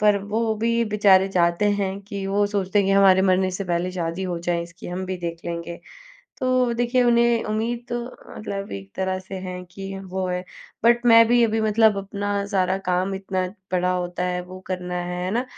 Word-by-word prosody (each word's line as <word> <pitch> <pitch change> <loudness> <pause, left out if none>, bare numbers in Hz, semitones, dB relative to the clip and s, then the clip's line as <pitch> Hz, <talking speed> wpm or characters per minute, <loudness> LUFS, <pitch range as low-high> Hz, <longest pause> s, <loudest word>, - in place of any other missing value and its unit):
पर 210 -1 +4 0.2
वो 225 -1 +1
भी 230 +1 +1
बेचारे 200 -3 +4
चाहते 170 +1 +2 0.2
हैं 195 0 -2
कि 200 -1 -5
वो 205 +1 +2
सोचते 200 -1 0
हैं 200 - +3
कि 195 - +3
हमारे 195 -1 +6
मरने 185 0 +3
से 190 +2 -4
पहले 175 +1 -1
शादी 170 0 -3
हो 180 -2 -2
जाए 170 0 -1
इसकी, 170 +1 -11
हम 180 +1 -4
भी 185 - -3
देख 170 -1 -5
लेंगे। 170 0 -5 0.6
तो 255 -1 +2
देखिए 240 +2 +2
उन्हें 235 -1 +3
उम्मीद 230 +3 -2
तो 240 - -2 0.4
मतलब 200 -2 -5
एक 95 0 -7
तरह 190 0 -1
से 185 +1 -9
हैं 180 0 -6
कि 195 0 -7
वो 190 0 -2
है 180 0 -2 0.4
बट 240 +1 +4
मैं 230 -1 +8
भी 240 0 +4
अभी 220 0 +1
मतलब 220 0 +4
अपना 200 +1 -4 0.2
सारा 185 -1 +2
काम 185 +2 0
इतना 190 -1 -2 0.2
पड़ा 180 0 +1
होता 180 0 -2
है 180 0 -1
वो 185 +1 -10
करना 180 -1 -4
है, 180 0 -4
है 185 - -2
ना, 240 +5 0
190 Hz, 205 wpm, -23 LUFS, 180-215 Hz, 0.6 s, मैं